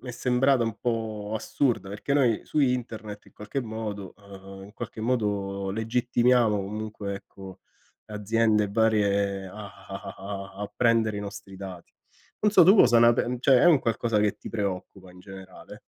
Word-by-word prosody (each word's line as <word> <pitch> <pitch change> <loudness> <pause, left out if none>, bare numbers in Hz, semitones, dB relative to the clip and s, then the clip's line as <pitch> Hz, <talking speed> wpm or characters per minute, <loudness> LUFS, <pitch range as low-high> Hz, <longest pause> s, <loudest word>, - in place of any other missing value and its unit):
mi 125 - -7
è - - -9
sembrata 125 +1 +2
un 115 -2 -3
po' 110 -3 -3
assurda, 115 -1 -1
perché 105 +8 -3
noi 125 -6 +2
su 150 - -1
internet 115 -5 -2
in - - -19
qualche 105 +6 -5
modo 110 -4 -6
ehm, 95 -1 -12
in 105 - -15
qualche 110 - -7
modo 100 -5 -1
legittimiamo 120 0 +2
comunque 105 0 -5
ecco 95 -1 -11 0.5
aziende 105 0 +1
varie, 100 -2 +1
a 95 +3 -11 0.3
a 95 0 -7
a - - -8 0.4
a - - -4
a 105 - -6
prendere 115 -3 +2
i 100 - -3
nostri 100 -1 -8
dati. 95 -3 -9 0.5
Non 210 -1 +2
so 190 - +7
tu 190 +6 +7
cosa 120 - +6
ne 120 0 +7
pen 120 +1 -1
cioè 130 0 +5
è - - +3
un 165 -6 +6
qualcosa 115 -2 0
che 105 -1 +1
ti - - -9
preoccupa 95 -3 -5
in 90 - -16
generale? 95 0 -12
110 Hz, 175 wpm, -26 LUFS, 100-120 Hz, 0.5 s, so